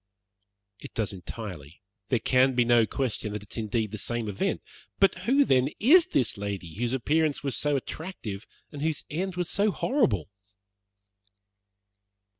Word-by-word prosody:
"It - - -11
does 110 -3 -1
entirely. 90 -5 -8 0.3
There 125 - +3
can 130 +3 +3
be 120 -1 +3
no 120 -2 +5
question 115 -5 -2
that 105 -1 -5
it 105 - -13
is - - -7
indeed 110 -1 -1
the 110 - -5
same 120 0 -3
event. 100 -2 -1 0.3
But 195 - +5 0.2
who, 280 +2 +5
then, 130 - +3
is 320 - +6
this 120 -5 +1
lady 100 -5 -4
whose 120 +5 -2
appearance 150 +4 +1
was 140 -3 -1
so 145 -1 +1
attractive 130 - -5 0.2
and 145 - -7
whose 155 -1 -1
end 180 +4 -2
was 180 -1 -1
so 205 +1 +2
horrible?" 135 - +1
120 Hz, 155 wpm, -27 LUFS, 105-155 Hz, 0.3 s, is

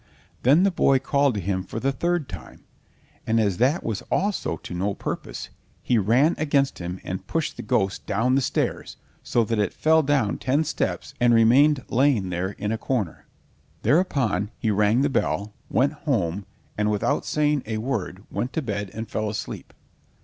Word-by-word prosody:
Then 145 +8 +5
the 200 - +3
boy 135 -5 +3
called 140 -1 +1
to - - -1
him 95 0 -2
for 110 - -6
the 135 +3 +1
third 170 +2 -1
time, 90 -6 -10 0.6
and 115 +1 +2
as 100 -5 +1
that 135 +7 +2
was 110 -3 -2
also 195 - 0
to 90 - -9
no 95 +3 -1
purpose, - - -5 0.3
he 120 -3 +2
ran 125 - +3
against 140 -3 +1
him 90 +1 -5
and 95 - -5
pushed 165 -2 -2
the - - -6
ghost 100 -6 -1
down 120 +5 +1
the 135 - +3
stairs, - - -2 0.2
so 120 - +1
that 115 0 -1
it 100 -3 0
fell 160 +1 +4
down 135 -8 +1
ten 140 +5 +1
steps - - -3
and 120 -1 +4
remained 130 +5 +5
lying 120 -8 +2
there 90 +3 -2
in 105 +2 -3
a 110 - -2
corner. 115 -12 -3 0.6
Thereupon 125 - +2
he 110 - 0
rang 105 +4 +3
the 145 - +3
bell, 105 -5 -1 0.2
went 140 +3 +2
home, 100 - -2 0.3
and 105 0 +2
without 105 +7 0
saying 150 -1 +1
a 110 -1 -2
word 110 -5 -3
went 125 - -3
to 160 - -1
bed 100 -4 -3
and 110 +1 -5
fell 110 -1 -2
asleep. 105 - -6
115 Hz, 180 wpm, -24 LUFS, 100-140 Hz, 0.6 s, Then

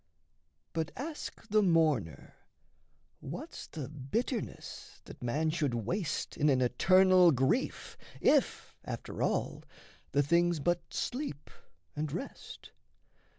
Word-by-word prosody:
But 160 0 -1
ask 295 -4 -6
the 215 +1 +4
mourner 155 - +1 0.9
what's - - -7
the 145 -5 -6
bitterness 175 - -4
That - - -12
man 150 +7 0
should 150 -6 0
waste 145 - -2
in 150 - +3
an 130 -2 +4
eternal 185 +7 +5
grief, 130 -2 0 0.2
If, - - +2
after - - -6
all, - - 0 0.5
the 145 +1 +3
thing's 170 +2 +3
but 175 +3 -1
sleep 245 - -4 0.4
and 150 -1 -2
rest? 260 - -7
160 Hz, 110 wpm, -32 LUFS, 140-185 Hz, 0.9 s, eternal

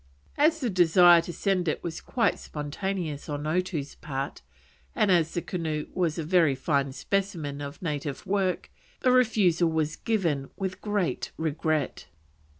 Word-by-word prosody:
As 310 +2 +3
the 245 -4 0
desire 175 -1 +6
to 170 - -6
send 185 -1 0
it 155 - -1
was 170 -2 -5
quite 230 -6 0
spontaneous 155 0 -4
on 145 0 -3
Otoo's 160 -3 -1
part, 140 -2 -5 0.5
and 210 -3 +3
as 165 -2 +2
the 175 - -1
canoe 160 -4 -3
was 170 -3 0
a 165 - -2
very 165 -4 +3
fine 140 0 0
specimen 160 -3 -2
of 145 +6 -7
native 145 -3 -3
work, 190 -1 -1 0.3
the 255 - +4
refusal 205 -9 +3
was 155 -1 -1
given 165 -11 -1
with 190 -2 -4
great 205 -4 -1
regret. 155 - -1
170 Hz, 150 wpm, -27 LUFS, 150-190 Hz, 0.5 s, desire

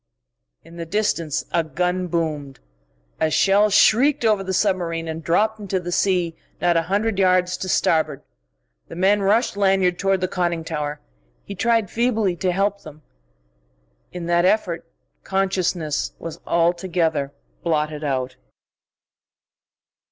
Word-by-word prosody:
In 170 - -14
the 170 - -5
distance 170 -6 -1
a 170 - +2
gun 180 +4 -1
boomed. 155 -5 -3 0.6
A 160 - +2
shell 200 +5 +3
shrieked 245 +6 +4
over 210 -3 +2
the 190 - -4
submarine 175 -4 0
and 160 0 -5
dropped 215 +7 +1
into 195 -2 -2
the 175 0 -6
sea 175 -3 +1 0.2
not 175 -1 +2
a 165 - +3
hundred 205 +1 0
yards 185 -1 +3
to 185 - -5
starboard. 155 -5 +1 0.6
The - - -9
men 195 +3 +3
rushed 210 +3 +2
Lanyard 190 -3 +2
toward 195 -1 +1
the 185 - +1
conning 175 -2 -1
tower. 150 -2 -4 0.4
He 200 - -7
tried 225 0 +1
feebly 225 -6 +1
to 185 0 0
help 200 +2 0
them. 155 -3 -13 1.1
In 175 -1 -6
that 175 0 +2
effort 185 -3 0 0.3
consciousness 185 -5 -1
was 165 -1 -8
altogether 170 -4 +1 0.3
blotted 155 -2 -1
out.... 130 -3 -2
180 Hz, 135 wpm, -22 LUFS, 165-195 Hz, 1.1 s, shrieked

